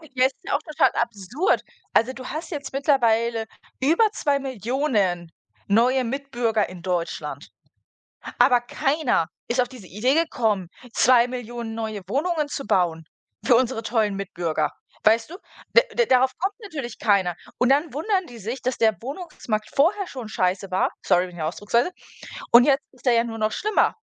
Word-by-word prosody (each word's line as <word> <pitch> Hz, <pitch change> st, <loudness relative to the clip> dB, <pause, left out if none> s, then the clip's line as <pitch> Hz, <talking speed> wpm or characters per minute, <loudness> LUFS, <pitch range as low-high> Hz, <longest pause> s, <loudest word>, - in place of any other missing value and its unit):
Ja, 255 Hz, 0 st, +4 dB
es 265 Hz, -, +1 dB
ist -, -, -43 dB
ja -, -, -3 dB
auch 285 Hz, -, -1 dB
total 310 Hz, -1 st, +2 dB
absurd. 235 Hz, -, 0 dB, 0.3 s
Also 235 Hz, +3 st, +3 dB
du 255 Hz, 0 st, -9 dB
hast 315 Hz, +4 st, -6 dB
jetzt 285 Hz, -4 st, -5 dB
mittlerweile 235 Hz, -5 st, +2 dB, 0.3 s
über 320 Hz, +11 st, +3 dB
2.000.000 250 Hz, -, -1 dB, 0.4 s
neue 250 Hz, +5 st, +3 dB
Mitbürger 240 Hz, -4 st, -1 dB
in 180 Hz, -1 st, -10 dB
Deutschland, 175 Hz, -2 st, -3 dB, 0.9 s
aber 245 Hz, 0 st, +5 dB
keiner 270 Hz, -, 0 dB, 0.2 s
ist 245 Hz, -, 0 dB
auf 245 Hz, -, +3 dB
diese 245 Hz, -8 st, -12 dB
Idee 225 Hz, +9 st, +1 dB
gekommen, 220 Hz, -, 0 dB, 0.2 s
2.000.000 240 Hz, -2 st, +2 dB
neue 220 Hz, -2 st, -4 dB
Wohnungen 300 Hz, -, 0 dB
zu 275 Hz, -1 st, -5 dB
bauen 165 Hz, -3 st, +1 dB, 0.4 s
für 250 Hz, -, +6 dB
unsere 245 Hz, -2 st, 0 dB
tollen 220 Hz, -3 st, 0 dB
Mitbürger. 175 Hz, -5 st, -2 dB, 0.3 s
Weißt 225 Hz, +4 st, +3 dB
du? 360 Hz, -, -7 dB, 0.4 s
D 485 Hz, 0 st, +4 dB
darauf 260 Hz, -, +4 dB
kommt 390 Hz, +2 st, -1 dB
natürlich 285 Hz, -, -6 dB
keiner. 195 Hz, -5 st, +2 dB, 0.2 s
Und 250 Hz, -, +2 dB
dann 285 Hz, +1 st, +2 dB
wundern 375 Hz, +6 st, 0 dB
die 240 Hz, -, -11 dB
sich, 230 Hz, +5 st, -5 dB
dass 255 Hz, 0 st, -2 dB
der 220 Hz, -2 st, +3 dB
Wohnungsmarkt 245 Hz, -, -4 dB
vorher 375 Hz, +7 st, +2 dB
schon 250 Hz, -5 st, -7 dB
scheiße 190 Hz, -1 st, -1 dB
war. 185 Hz, -, +1 dB
Sorry, 180 Hz, +1 st, +3 dB
wegen 175 Hz, -1 st, -12 dB
der 155 Hz, -, -1 dB
Ausdrucksweise. 210 Hz, -, 0 dB, 0.6 s
Und 240 Hz, +1 st, +9 dB
jetzt 280 Hz, +1 st, +3 dB
ist 255 Hz, 0 st, -19 dB
er 250 Hz, -, +5 dB
ja 230 Hz, 0 st, +3 dB
nur 230 Hz, -1 st, -5 dB
noch 215 Hz, -1 st, 0 dB
schlimmer. 425 Hz, -, +1 dB
240 Hz, 160 wpm, -24 LUFS, 215-275 Hz, 0.9 s, Und